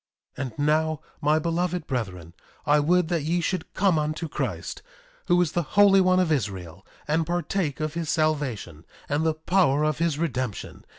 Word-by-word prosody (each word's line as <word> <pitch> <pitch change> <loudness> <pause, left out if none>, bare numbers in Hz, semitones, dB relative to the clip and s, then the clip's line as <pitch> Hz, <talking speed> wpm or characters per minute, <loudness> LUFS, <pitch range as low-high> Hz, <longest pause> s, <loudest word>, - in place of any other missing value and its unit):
1:26 135 0 -3
And 110 - -13
now, 155 0 +1 0.2
my 150 +1 +3
beloved 170 +1 -1
brethren, 95 - -4 0.3
I 150 +1 +4
would 175 +3 +2
that 170 -3 0
ye 165 +4 0
should 175 0 -2
come 190 -5 +3
unto 155 +2 -2
Christ, - - -4 0.5
who 175 -1 +4
is 160 - -3
the 175 - 0 0.2
Holy 200 -1 +7
One 185 0 +3
of 180 -3 +1
Israel, 95 - -3 0.2
and 160 +2 +2
partake 175 -2 -2
of 155 -1 -2
his 165 -1 -3
salvation, 135 - -1 0.2
and 145 +2 0
the 160 -1 +1
power 155 -3 +2
of 155 -1 0
his 165 -3 +1
redemption. 130 -9 -3
155 Hz, 175 wpm, -25 LUFS, 140-175 Hz, 0.5 s, Holy